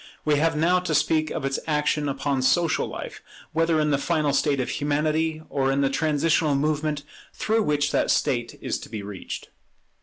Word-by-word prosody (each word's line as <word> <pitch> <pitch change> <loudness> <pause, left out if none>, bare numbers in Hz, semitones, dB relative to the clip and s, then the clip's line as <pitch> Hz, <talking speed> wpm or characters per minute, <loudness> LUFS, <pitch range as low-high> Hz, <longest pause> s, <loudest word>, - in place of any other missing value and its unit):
We 150 -1 +3
have 165 +2 +2
now 170 +4 +3
to 180 -4 -1
speak 155 +1 +2
of - - -3
its 135 0 -1
action 150 -1 +1
upon 135 0 -1
social 160 +5 +2
life, - - -7 0.3
whether 165 0 +2
in 150 -1 +1
the 140 - +2
final 155 -2 +1
state 140 -1 +2
of 125 - -1
Humanity, 155 +2 0
or 135 -1 0
in 135 +1 +1
the 135 -1 +2
transitional 155 0 +2
movement 150 0 0 0.3
through 220 +1 +1
which 145 -5 +1
that - - +1
state 120 -2 0
is - - -2
to - - -11
be 105 -2 -5
reached. 100 -2 -7
150 Hz, 185 wpm, -25 LUFS, 140-160 Hz, 0.3 s, We